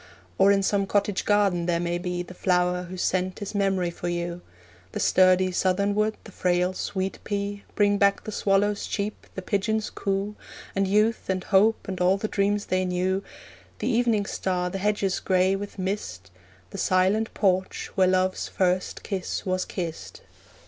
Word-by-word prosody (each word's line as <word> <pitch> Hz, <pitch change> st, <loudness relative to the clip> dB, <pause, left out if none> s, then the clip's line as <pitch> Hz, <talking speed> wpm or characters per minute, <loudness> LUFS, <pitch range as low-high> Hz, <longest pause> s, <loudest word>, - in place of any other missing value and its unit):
Or 195 Hz, +1 st, +6 dB
in 200 Hz, -1 st, +3 dB
some 200 Hz, 0 st, +1 dB
cottage 200 Hz, 0 st, 0 dB
garden 200 Hz, -5 st, +2 dB
there 170 Hz, -1 st, +1 dB
may 175 Hz, 0 st, -1 dB
be 180 Hz, 0 st, -3 dB
The 180 Hz, -, -11 dB
flower 180 Hz, 0 st, +1 dB
whose 185 Hz, -1 st, -4 dB
scent 185 Hz, 0 st, 0 dB
is 200 Hz, -, -6 dB
memory 195 Hz, -3 st, +1 dB
for 175 Hz, -, -6 dB
you; 175 Hz, 0 st, -3 dB, 0.5 s
The -, -, -3 dB
sturdy 185 Hz, 0 st, +4 dB
southern 190 Hz, +3 st, +1 dB
wood, 215 Hz, +1 st, 0 dB
the 215 Hz, -, -12 dB
frail 180 Hz, 0 st, +1 dB
sweet 190 Hz, 0 st, -3 dB
pea, 200 Hz, -1 st, -3 dB
Bring 205 Hz, -1 st, +3 dB
back 200 Hz, 0 st, +3 dB
the 215 Hz, -, -6 dB
swallow's 205 Hz, 0 st, +1 dB
cheep, 205 Hz, +1 st, -4 dB
the 190 Hz, -, -5 dB
pigeon's 215 Hz, +3 st, -1 dB
coo, 195 Hz, +1 st, -2 dB, 0.4 s
And 195 Hz, 0 st, +1 dB
youth, 210 Hz, +3 st, +1 dB
and 185 Hz, -1 st, 0 dB
hope, 210 Hz, +3 st, +3 dB
and 185 Hz, -2 st, -4 dB
all 185 Hz, +2 st, +4 dB
the 215 Hz, -, -2 dB
dreams 205 Hz, 0 st, 0 dB
they 185 Hz, 0 st, 0 dB
knew, 185 Hz, +2 st, 0 dB, 0.5 s
The -, -, -2 dB
evening 230 Hz, -4 st, +2 dB
star, 180 Hz, -2 st, -2 dB
the 195 Hz, -, -3 dB
hedges 200 Hz, -1 st, 0 dB
grey 185 Hz, 0 st, +2 dB
with 205 Hz, +1 st, -6 dB
mist, 95 Hz, -, -4 dB, 0.4 s
The -, -, -6 dB
silent 190 Hz, +4 st, +2 dB
porch 190 Hz, -2 st, 0 dB
where 190 Hz, -1 st, +3 dB
Love's 185 Hz, 0 st, +1 dB
first 185 Hz, 0 st, -1 dB
kiss 195 Hz, -3 st, -3 dB
was 185 Hz, -1 st, 0 dB
kissed. 170 Hz, -4 st, -6 dB
190 Hz, 170 wpm, -25 LUFS, 180-205 Hz, 0.5 s, Or